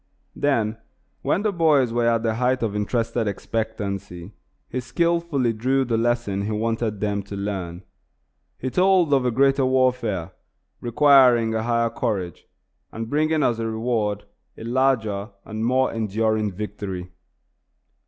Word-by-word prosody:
Then, 115 -6 0 0.4
when 195 - 0
the 215 - +1
boys 150 -9 +3
were 120 0 +1
at 115 -1 +2
the 115 -1 +1
height 125 +2 0
of 105 -2 -1
interested 115 +2 -1
expectancy, 100 -3 -4 0.4
he 130 - -3
skilfully 160 -2 0
drew 130 +4 +1
the 120 -2 0
lesson 115 -4 0
he 105 +2 -3
wanted 110 -1 -1
them 105 -1 -1
to 100 +1 -8
learn. 95 -3 -4 0.7
He 130 - -4
told 180 -3 +3
of 135 -2 +3
a - - +3
greater 135 +3 +3
warfare, 125 -8 +1 0.5
requiring 125 -2 +5
a 110 - 0
higher 115 0 +1
courage, 100 -8 -3 0.4
and 115 0 -6
bringing 155 +1 +2
as 120 -2 +1
a 115 - -1
reward 110 -3 -1 0.3
a - - -9
larger 115 -5 0 0.2
and 110 0 -5
more 130 +2 +2
enduring 110 -1 0
victory. 95 -2 -6
115 Hz, 140 wpm, -23 LUFS, 105-130 Hz, 0.7 s, requiring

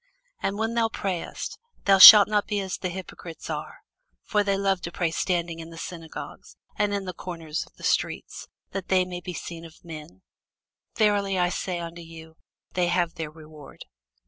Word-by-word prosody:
And 195 - -2
when 225 +1 -1
thou 230 -1 +1
prayest, 190 -5 -4 0.3
thou 195 -1 +5
shalt 205 +1 +12
not 210 -1 0
be 210 -1 -1
as 190 -2 -4
the 185 - -3
hypocrites 175 -3 -8
are: 150 - -6 0.4
for 210 -1 +1
they 200 -1 0
love 195 -2 0
to 170 - -6
pray 170 -1 -1
standing 170 -1 -1
in 165 0 -8
the 165 - -12
synagogues 165 -1 -9 0.2
and 205 0 0
in 200 -1 -2
the 185 - -5
corners 165 -3 -5
of - - -25
the - - -16
streets, - - -2 0.2
that 195 -2 -5
they 185 -1 +3
may 180 -1 -7
be 180 -1 -6
seen 165 +1 -7
of 165 +1 -15
men. 150 - -10 0.7
Verily 200 -3 +2
I 180 -1 +2
say 180 0 -3
unto 170 0 -7
you, 160 -1 -12 0.4
They 180 -1 +1
have 175 -1 0
their 160 -2 -5
reward. 155 -2 -13
180 Hz, 185 wpm, -25 LUFS, 165-195 Hz, 0.7 s, shalt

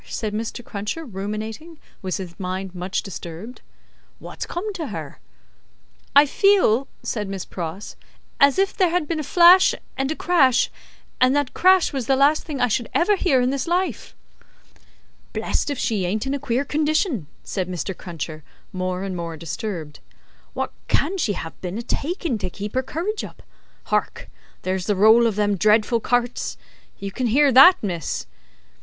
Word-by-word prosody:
said 215 -3 -3
Mr. 225 +2 -4
Cruncher, 210 +11 -4
ruminating, 220 - -6 0.2
with 185 -2 -2
his 180 -3 -7
mind 185 0 -4
much 180 +1 -3
disturbed; 175 - -8 0.6
"wot's - - -7
come 405 +5 -4
to 330 -6 -4
her?" 160 - -7 1.0
"I 285 +1 +9
feel," 285 - +3 0.2
said 210 -3 -3
Miss 195 -2 -5
Pross, 175 +3 -6 0.4
"as 280 -1 +5
if 390 0 +1
there 370 -2 +3
had 340 -2 0
been 325 0 -2
a - - -2
flash 350 +5 +6 0.2
and 270 0 -1
a 315 - -1
crash, 270 -10 +3 0.5
and 255 +2 +4
that 290 -3 0
crash 370 -3 +4
was 265 -4 -3
the 270 - +4
last 285 +3 +3
thing 295 -4 -5
I 250 - +3
should 235 +1 -1
ever 405 +4 +4
hear 285 -9 +2
in 250 +1 +1
this 275 0 -2
life." 360 +2 -1 1.2
"Blest - - -1
if 285 - -2
she 215 -5 0
ain't 210 +6 -1
in 270 - -1
a 280 - -2
queer 265 0 -1
condition!" 300 - 0 0.2
said 185 -2 -3
Mr. 185 +1 -4
Cruncher, 160 -3 -7 0.3
more 185 0 -2
and 195 -2 -4
more 170 -2 -5
disturbed. 165 -2 -5 0.6
"Wot - - -3
can 385 +1 +1
she 220 -10 +1
have 165 -3 -7
been 185 +2 -4
a 235 - -4
takin', 300 - -2
to 185 -2 -3
keep 205 +3 -6
her 260 - +1
courage 350 +11 -3
up? - - -10 0.4
Hark! - - -2 0.3
There's 185 -1 -2
the 205 - +2
roll 220 +4 +6
of 220 - -1
them 205 -1 +1
dreadful 215 +4 +3
carts! 245 +1 -1 0.4
You 200 0 -6
can 250 +4 -1
hear 280 +5 +4
that, 270 +9 +9
miss?" 170 - -3
235 Hz, 170 wpm, -22 LUFS, 190-295 Hz, 1.2 s, I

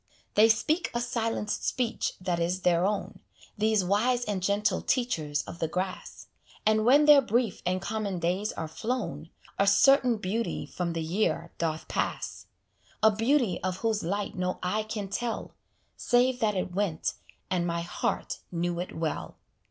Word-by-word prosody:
They 220 +2 +6
speak 310 +10 +2
a - - +2
silent 230 -3 -2
speech 245 -3 -1
that 180 -2 -1
is 175 +2 0
their 175 +1 +3
own, 205 -1 -3 0.4
These 215 -2 +2
wise 240 +6 +2
and 205 -3 -2
gentle 200 +3 +1
teachers 160 - 0
of 170 - -9
the 165 - 0
grass; 185 +3 -4 0.4
And 215 0 +3
when 285 +5 +6
their 295 -2 +8
brief 235 -4 0
and 185 +1 +1
common 210 -3 -2
days 180 +5 0
are 160 - -4
flown, 220 0 -4 0.3
A 200 - +3
certain 250 +3 +5
beauty 215 +3 -2
from 175 -2 -3
the 165 -1 -2
year 170 0 -1
doth 160 -1 -2
pass: - - -3 0.6
A 220 - +7
beauty 225 -1 +1
of 185 -1 -1
whose 220 -2 +1
light 200 +4 -2
no 180 0 -2
eye 210 +4 0
can 215 -2 -4
tell, 235 +4 -3 0.4
Save 245 +1 +2
that 215 -4 +1
it 185 -1 -2
went; 185 -5 -1 0.4
and 175 -2 +1
my 170 0 -1
heart 175 +1 -2
knew 175 0 -1
it 175 -2 -5
well. 160 -1 -3
205 Hz, 160 wpm, -28 LUFS, 180-230 Hz, 0.6 s, their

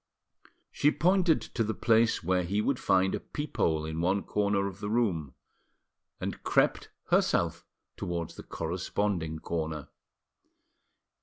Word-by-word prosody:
She 145 - +3
pointed 180 +1 +3
to 115 - -2
the 110 0 -2
place 115 -3 +3
where 90 +2 +2
he 95 +4 -1
would 125 +4 +1
find 95 0 +3
a - - -1
peep 150 0 -6
hole 80 -1 +2
in 80 +1 -3
one 95 +3 +1
corner 100 -1 +1
of 100 -1 -5
the 105 -1 -4
room, 95 - 0 0.8
and - - -4
crept - - +2 0.2
herself - - +2 0.3
towards 85 -2 -3
the - - -9
corresponding 85 -1 -2
corner. 80 -2 -4
95 Hz, 135 wpm, -29 LUFS, 80-110 Hz, 0.8 s, She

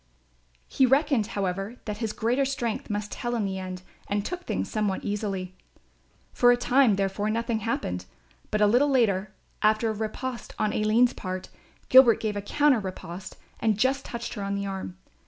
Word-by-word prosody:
He 265 - +3
reckoned 270 -4 +3
however 195 +3 -2
that 210 -1 -4
his 225 -3 -1
greater 245 +6 +1
strength 245 -5 -2
must 210 0 -3
tell 240 0 -3
in 220 -3 0
the 190 -1 -3
end 185 -1 -6 0.2
and 205 0 -1
took 360 0 -5
things - - -2
somewhat 210 -4 -1
easily. 195 -3 -3 0.8
For 245 0 +5
a 245 - +4
time 245 -2 +4
therefore 200 +2 -1
nothing 230 0 -1
happened, 90 - -2 0.4
but 215 - 0
a - - +7
little 245 +8 +4
later, 210 -7 +2 0.3
after 215 +1 +3
a - - -3
riposte 230 +4 -5
on 215 - 0
Aline's 220 +4 +3
part, 185 -1 -5 0.4
Gilbert 255 -3 +7
made 215 -1 -1
a 205 - -2
counter 285 +5 +3
riposte 185 -1 -7 0.2
and 220 -3 +1
just 265 +4 +1
touched 235 0 -5
her 210 - -5
on 200 0 -2
the 200 0 -2
arm. 190 -2 -5
215 Hz, 175 wpm, -26 LUFS, 200-245 Hz, 0.8 s, a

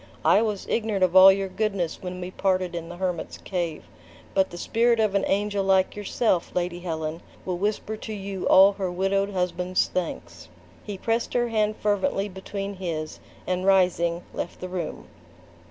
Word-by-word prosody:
I 210 - +6
was 210 -3 -2
ignorant 215 -4 0
of 185 0 +2
all 190 +1 +10
your 195 0 -1
goodness, 195 -4 -2
when 180 0 -6
we 180 0 -6
parted 185 -2 0
in 170 -1 -5
the 175 - -8
hermit's 180 -3 -3
cave. 175 -4 -3 0.5
But 190 -1 +2
the 175 - -9
spirit 235 +5 +2
of 215 -3 +2
an 200 -1 +2
angel 205 0 0
like 190 -1 +2
yourself, 205 -2 0
Lady 175 -1 -1
Helen, 160 -2 -4 0.2
will 180 -2 -2
whisper 210 +2 -1
to 220 - -8
you 195 -2 -4
all 195 +1 +8
her 190 -2 -3
widowed 195 +2 0
husband's 180 -1 0
thanks." 180 -2 -5 0.3
He 205 -2 -6
pressed 230 +4 -1
her 240 -1 +2
hand 215 -1 0
fervently 205 0 0
between 195 +1 -6
his, 160 -4 -4 0.3
and 185 0 -1
rising, 180 -3 +2
left - - -5
the 185 - -6
room. 180 -3 -5
190 Hz, 170 wpm, -25 LUFS, 180-205 Hz, 0.5 s, all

